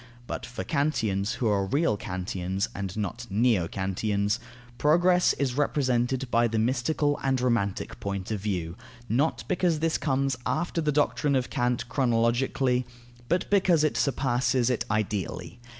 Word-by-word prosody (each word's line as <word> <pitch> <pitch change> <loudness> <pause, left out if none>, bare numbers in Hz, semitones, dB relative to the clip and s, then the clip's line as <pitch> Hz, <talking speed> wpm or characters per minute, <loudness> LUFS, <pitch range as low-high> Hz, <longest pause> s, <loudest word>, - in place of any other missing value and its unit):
But - - -5
for 120 - -5
Kantians, 110 -9 0
who 120 - -1
are 100 -2 +1
real 140 - +2
Kantians 95 0 -3
(and 95 0 -5
not 115 +4 -4
neo 105 -3 +2
Kantians), 100 +3 -1 0.4
progress 175 +4 +4
is 135 -3 -1
represented 130 -2 +1
by 120 0 +4
the 115 0 -2
mystical 130 +6 +1
and 135 -1 +1
romantic 115 -6 -1
point 100 0 -4
of 105 - -1
view; 90 -5 -3 0.3
not 135 +9 +1
because 175 -3 +1
this 160 +1 0
comes 135 -2 0
after 165 +4 -1
the 150 -1 +1
doctrine 145 0 +1
of 130 -1 -1
Kant 120 0 0
chronologically, 125 +1 +1 0.5
but 175 +1 +1
because 185 -6 +4
it 155 - +1
surpasses 130 -2 +1
it 120 -1 -1
ideally. 105 -1 -2
120 Hz, 145 wpm, -27 LUFS, 105-140 Hz, 0.5 s, progress